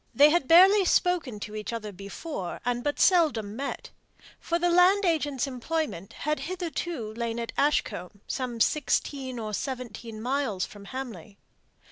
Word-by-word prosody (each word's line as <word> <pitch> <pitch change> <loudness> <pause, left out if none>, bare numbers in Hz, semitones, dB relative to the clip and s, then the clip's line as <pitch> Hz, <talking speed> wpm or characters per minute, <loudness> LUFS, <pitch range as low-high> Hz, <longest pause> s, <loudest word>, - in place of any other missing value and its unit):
They 290 +2 +7
had 340 -5 +2
barely 380 +4 +7
spoken 345 - +1
to 210 - -6
one 215 0 -4
another 225 -3 -4
before, 200 - -6
and 245 0 -1
but 290 0 -1
seldom 280 - +3
met; 275 +3 -5 0.5
for 340 - -1
the 350 0 +1
land 370 +3 +5
agent's 295 -6 +1
employment 270 - -3
had 300 0 -2
hitherto 335 - -4
lain 230 0 -3
at 235 - -4
Ashcombe, 200 -9 0
some 250 -3 -3
sixteen 270 -1 0
or 215 -2 -4
seventeen 235 -3 -5
miles 245 -5 -1
from 205 -1 -13
Hamley. 220 -6 -7
260 Hz, 145 wpm, -27 LUFS, 220-325 Hz, 0.5 s, They